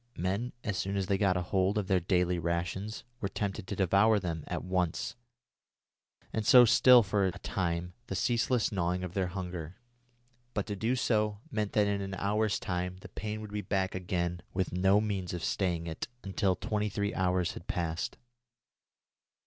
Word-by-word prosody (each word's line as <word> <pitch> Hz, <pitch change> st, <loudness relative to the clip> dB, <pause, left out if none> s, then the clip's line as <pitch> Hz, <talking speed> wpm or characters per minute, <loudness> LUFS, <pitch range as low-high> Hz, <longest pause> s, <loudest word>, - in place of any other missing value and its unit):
Men, 100 Hz, +8 st, -1 dB
as 100 Hz, -3 st, -2 dB
soon 100 Hz, +1 st, -1 dB
as 95 Hz, -, 0 dB
they 95 Hz, +1 st, 0 dB
got 95 Hz, -3 st, +3 dB
hold 95 Hz, +3 st, +1 dB
of 105 Hz, -, 0 dB
their 95 Hz, -1 st, +3 dB
day's 90 Hz, 0 st, +1 dB
rations, 85 Hz, +5 st, -2 dB, 0.2 s
were 100 Hz, -, -2 dB
tempted 100 Hz, -2 st, -3 dB
to 100 Hz, -, -3 dB
devour 100 Hz, +4 st, +4 dB
them 85 Hz, -5 st, -3 dB
at -, -, -3 dB
once, 90 Hz, 0 st, -1 dB, 1.2 s
and 110 Hz, -, 0 dB
so 125 Hz, +3 st, +8 dB
still 120 Hz, +1 st, +7 dB
for 100 Hz, 0 st, +1 dB
a -, -, 0 dB
time 85 Hz, -1 st, -2 dB
the -, -, -3 dB
ceaseless 120 Hz, 0 st, +1 dB
gnawing 90 Hz, -2 st, 0 dB
of 90 Hz, -1 st, -5 dB
their 95 Hz, -2 st, 0 dB
hunger; 90 Hz, -2 st, -5 dB, 0.8 s
but 100 Hz, -, 0 dB
to 105 Hz, -, -4 dB
do 115 Hz, +5 st, 0 dB
so 105 Hz, -4 st, +1 dB
meant 105 Hz, -4 st, -1 dB
that 105 Hz, -1 st, +4 dB
in 100 Hz, -1 st, 0 dB
an 95 Hz, -1 st, -4 dB
hour's 105 Hz, +2 st, +1 dB
time 90 Hz, 0 st, -3 dB
the -, -, -10 dB
pain 110 Hz, 0 st, -5 dB
would 105 Hz, -1 st, -8 dB
be 105 Hz, 0 st, -2 dB
back 95 Hz, -1 st, -1 dB
again 90 Hz, -1 st, -2 dB
with 95 Hz, -2 st, -1 dB
no 95 Hz, +3 st, +4 dB
means 95 Hz, -4 st, -2 dB
of 85 Hz, -, -5 dB
staying 85 Hz, -4 st, 0 dB
it 80 Hz, -1 st, -4 dB, 0.2 s
until 95 Hz, -1 st, +1 dB
twenty 105 Hz, +2 st, -1 dB
three 100 Hz, +1 st, -1 dB
hours 90 Hz, -1 st, +1 dB
had 85 Hz, -, -10 dB
passed. 85 Hz, -1 st, -2 dB
95 Hz, 180 wpm, -31 LUFS, 90-105 Hz, 1.2 s, so